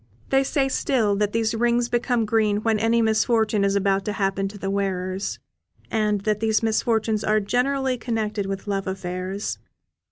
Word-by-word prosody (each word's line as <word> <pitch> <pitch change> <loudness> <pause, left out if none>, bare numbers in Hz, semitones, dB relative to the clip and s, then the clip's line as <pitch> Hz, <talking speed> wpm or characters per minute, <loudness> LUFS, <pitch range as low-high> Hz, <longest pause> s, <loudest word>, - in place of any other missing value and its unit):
They 270 0 +4
say 270 0 +1
still 240 -6 +1
that 210 0 0
these 225 0 0
rings 235 +1 +1
become 240 -1 0
green 215 -1 +1
when 225 -2 +2
any 225 +1 +2
misfortune 220 -1 +2
is 200 0 +2
about 195 -1 +1
to 210 - -2
happen 195 -1 0
to 205 +1 -9
the 195 -1 -3
wearers, 190 -1 -2 0.5
and 210 -2 +1
that 210 0 0
these 220 0 +1
misfortunes 220 -1 +1
are 215 0 +3
generally 255 +4 0
connected 215 -4 -2
with 195 0 -4
love 195 -2 -2
affairs. 190 +1 -4
215 Hz, 165 wpm, -23 LUFS, 200-230 Hz, 0.5 s, They